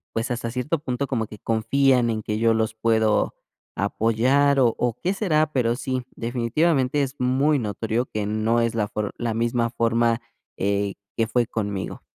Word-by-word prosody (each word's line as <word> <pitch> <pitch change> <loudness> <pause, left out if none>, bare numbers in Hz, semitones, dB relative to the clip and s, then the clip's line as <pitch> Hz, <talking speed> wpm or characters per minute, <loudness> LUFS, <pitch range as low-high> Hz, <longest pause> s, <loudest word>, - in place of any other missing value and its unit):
pues, 115 +2 -1
hasta 115 -1 -3
cierto 135 +6 -1
punto 135 -1 -3
como 115 -4 -1
que 105 -1 -12
confían 125 +2 +2
en 110 -1 -1
que 105 0 -3
yo 115 0 +3
los 110 0 0
puedo 110 -1 +2 0.4
apoyar, 135 +6 +2
o 120 -3 +3
o, 120 -2 0
¿qué 185 +3 +1
será?, 155 -7 +1
pero 120 -3 +1
sí, 130 -2 -2
definitivamente 130 +4 +1
es 135 0 -2
muy 135 +3 +2
notorio 110 +2 -2
que 105 -4 -3
no 110 +2 +1
es 115 -1 0
la 105 -2 0
for 105 -1 -3
la 115 -2 -2
misma 115 +1 0
forma, 115 0 +1 0.4
eh, 100 0 0 0.2
que 115 -1 +1
fue 120 -1 +1
conmigo. 100 -4 -4
115 Hz, 175 wpm, -24 LUFS, 110-130 Hz, 0.4 s, yo